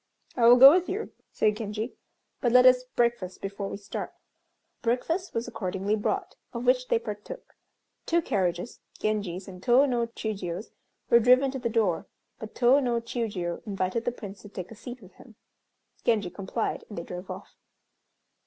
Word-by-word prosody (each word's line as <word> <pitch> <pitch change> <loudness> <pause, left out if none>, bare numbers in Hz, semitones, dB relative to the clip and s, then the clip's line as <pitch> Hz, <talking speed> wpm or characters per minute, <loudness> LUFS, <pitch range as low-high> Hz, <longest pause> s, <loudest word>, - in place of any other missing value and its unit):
"I 235 -2 +4
will 240 - +9
go 270 +2 +11
with 360 +2 +2
you," 410 +4 -3 0.2
said 210 -1 +1
Genji, 215 +2 -4 0.5
"but 240 - +1
let 250 +1 +7
us 255 0 +6
breakfast 235 -6 0
before 200 0 -5
we - - -5
start." 200 0 -6 0.7
Breakfast 320 +10 -1
was 230 +1 -1
accordingly 205 -2 -2
brought, 210 - -2 0.2
of 235 +1 -4
which 250 0 +3
they - - +3
partook. 225 - -8 0.5
Two 340 - +3
carriages, 190 - -1 0.2
Genji's 200 -4 -2
and 180 -2 -10
Tô 260 +5 +5
no 240 -3 0
Chiûjiô's, 205 -4 -5 0.4
were 235 - +8
driven 255 +3 +5
to 265 - -5
the 240 -1 -1
door, 215 -7 0 0.3
but 220 - -9
Tô 255 +3 +5
no 240 -3 +1
Chiûjiô 215 -7 -3
invited 195 +3 -2
the 245 - +1
Prince 205 -4 -9
to 205 - -12
take 185 -1 -7
a - - -9
seat 245 +1 -9
with 185 -1 -16
him. 230 - -16 0.7
Genji 210 -6 +1
complied, 200 +3 -3
and 205 - -9
they 170 - -3
drove 180 +2 -8
off. - - -8
225 Hz, 170 wpm, -27 LUFS, 200-245 Hz, 0.7 s, go